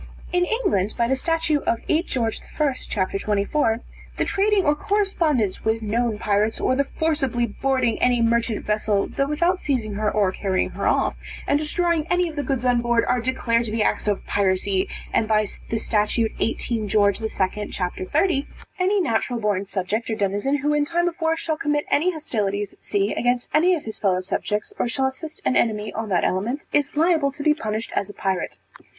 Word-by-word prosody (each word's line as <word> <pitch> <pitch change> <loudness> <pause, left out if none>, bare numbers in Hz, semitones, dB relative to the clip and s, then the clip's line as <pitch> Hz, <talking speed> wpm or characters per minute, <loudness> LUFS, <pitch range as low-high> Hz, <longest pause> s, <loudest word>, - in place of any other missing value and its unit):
In 355 0 +3
England 215 - 0
by 235 - +2
the 265 - +2
statute 325 +1 0
of 230 - +3
8 325 +3 +1
George 230 -4 -1 0.2
I, 295 -3 +3
c. - - -10 0.3
24, 220 +4 +1 0.4
the - - +1
trading 400 -1 +2
or 295 - +4
corresponding 310 - +1
with 220 0 0
known 225 +1 0
pirates, 210 +1 +1
or 255 - +2
the 280 +1 +1
forcibly 275 -7 0
boarding 250 +1 0
any 245 -1 +3
merchant 230 -1 +1
vessel, 210 -1 +1
(though 275 - -1
without 340 +5 +1
seizing 245 - -1
her 210 +1 0
or 205 -3 +2
carrying 190 -1 -1
her - - -2
off,) - - +2 0.3
and 285 - +2
destroying 330 +1 0
any 355 0 +2
of 320 - -7
the 290 - -1
goods 265 -3 -2
on 245 -1 +3
board, 235 -1 +2
are 250 -1 +1
declared 235 -1 +1
to 215 - -4
be 220 -1 +1
acts - - 0
of 205 -1 0
piracy; 190 -1 +1 0.2
and 220 - +2
by 215 -1 +3 0.2
the 225 - 0
statute 220 +1 +1
18 225 -1 -1
George 200 0 +2
II. 220 - 0
c. 190 -2 -2
30, 305 -3 +2 0.3
any 390 +3 +2
natural 235 -4 0
born 205 -3 0
subject 200 +4 -2
or 220 - 0
denizen 205 +7 0
who 295 +1 0
in 295 0 +3
time 345 +3 0
of 350 +1 -4
war, 325 0 +2
shall 315 -1 -2
commit 295 -2 0
any 330 +5 +3
hostilities 205 - -2
at - - -26
sea, 200 0 0
against 245 0 0
any 350 +4 +4
of 310 - -5
his 220 - -6
fellow 185 -3 +2
subjects, 210 +3 -2
or - - +1
shall 265 +2 0
assist 305 +4 -5
an - - +2
enemy, 215 -2 +1
on 220 -1 -4
that 180 -3 +2
element, 230 +10 -1
is 290 0 +1
liable 315 -3 +3
to 285 +1 -7
be 305 0 +5
punished 220 -6 -4
as 200 - -1
a - - -8
pirate. 190 -3 -2
235 Hz, 200 wpm, -23 LUFS, 210-300 Hz, 0.4 s, be